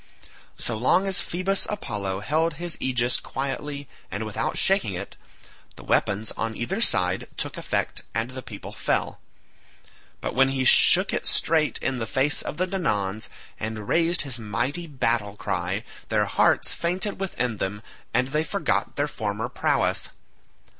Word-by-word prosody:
So 115 - -3
long 130 - +3
as 190 -2 +2
Phoebus 190 +3 0
Apollo 100 - -3
held 160 +8 +1
his 170 0 -2
aegis 125 -1 +2
quietly 140 +1 -4 0.2
and 100 +3 -3
without 105 - -2
shaking 190 - +2
it, 100 +3 -6 0.6
the - - -12
weapons 105 +2 +1
on 115 -1 -3
either 190 - -2
side 90 - +3
took - - -3
effect - - -2
and 115 +3 -1
the 130 0 -6
people 105 -5 -9
fell, - - -1 1.0
but - - -3
when 135 +1 +4
he 135 -1 0
shook - - +7
it - - -1
straight 155 -2 +3
in 130 -2 0
the 115 - -3
face 135 +3 +2
of - - -5
the 185 - +2
Danaans 110 - -1 0.3
and 110 -1 -4
raised 170 +1 +3
his 130 -4 -3
mighty 130 - -2
battle 115 -7 0
cry 95 0 -2 0.3
their - - +2
hearts - - +3
fainted 185 +4 -1
within 125 - -2
them 105 +2 -3 0.3
and 125 +2 +1
they 150 +3 +1
forgot 200 +4 -1
their 145 +1 +1
former 110 -2 -3
prowess. - - +1
130 Hz, 155 wpm, -25 LUFS, 105-165 Hz, 1.0 s, shook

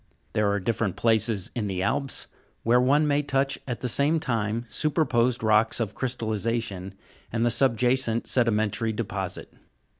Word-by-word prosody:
There 105 -1 +2
are 100 - 0
different 105 -1 -1
places 110 -3 +1
in 110 -4 -2
the 95 -1 -2
Alps, 135 +6 -1 0.4
where 120 +2 +4
one 145 +4 +3
may 145 0 +2
touch 140 -1 0
at 125 -3 -4
the 125 - -1
same 145 +7 +2
time, 115 -3 -2
superposed 125 -6 +1
rocks 110 +1 +3
of 110 -4 -2
crystallization 110 -5 -3 0.4
and 115 +1 0
the 120 - +3
subjacent 120 -1 +2
sedimentary 110 -2 +1
deposit. 95 -4 -5
115 Hz, 145 wpm, -26 LUFS, 105-125 Hz, 0.4 s, where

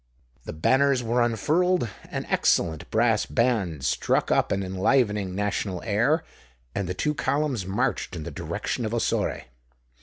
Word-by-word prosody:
The - - -6
banners 130 - +2
were 120 +1 +1
unfurled; 155 - +2 0.2
an - - -4
excellent 80 -2 +1
brass 110 -1 +2
band 105 - 0
struck - - +1
up - - +2
an 100 0 0
enlivening 100 0 +1
national 100 -2 -2
air; 115 +10 +2 0.5
and 100 -3 -2
the 90 - -2
two 150 +10 0
columns 140 -7 -1
marched 105 -1 -1
in 80 - -5
the - - -6
direction 120 - -3
of 110 +1 -2
Ossore. 115 - 0
115 Hz, 145 wpm, -25 LUFS, 95-130 Hz, 0.5 s, banners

